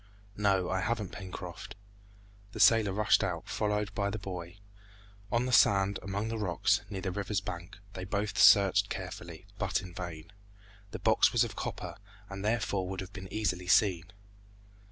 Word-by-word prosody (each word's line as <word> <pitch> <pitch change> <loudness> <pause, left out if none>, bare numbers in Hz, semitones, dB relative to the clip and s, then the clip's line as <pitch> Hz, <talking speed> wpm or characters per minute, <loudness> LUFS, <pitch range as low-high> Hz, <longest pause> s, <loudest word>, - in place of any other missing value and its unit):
"No, 100 -3 +2
I 95 - 0
haven't, 105 -1 -2
Pencroft." 95 -3 -8 0.8
The - - -7
sailor 110 -3 +5
rushed 105 +2 +3
out, 90 -4 -3
followed 105 0 -1
by 100 -1 -1
the 105 - -3
boy. 90 -3 -7 0.7
On 120 +1 +1
the 130 - -2
sand, 100 -4 +4
among 100 +2 -3
the 115 -1 -3
rocks, 105 +2 +1
near 95 -2 -5
the 95 - -2
river's 100 +1 -2
bank, 85 -3 -7 0.2
they 90 - -6
both 100 +2 -2
searched 100 0 +6
carefully, 90 -2 -7
but 95 +1 0
in 90 -2 -10
vain. 85 -1 -7 0.6
The - - -6
box - - +4
was - - +3
of - - -5
copper, - - -5 0.3
and 100 0 -6
therefore 105 -4 0
would 95 -1 -4
have 95 +2 -9
been 95 -1 -9
easily 90 -4 -2
seen. 90 -3 +3
100 Hz, 165 wpm, -30 LUFS, 90-105 Hz, 0.8 s, searched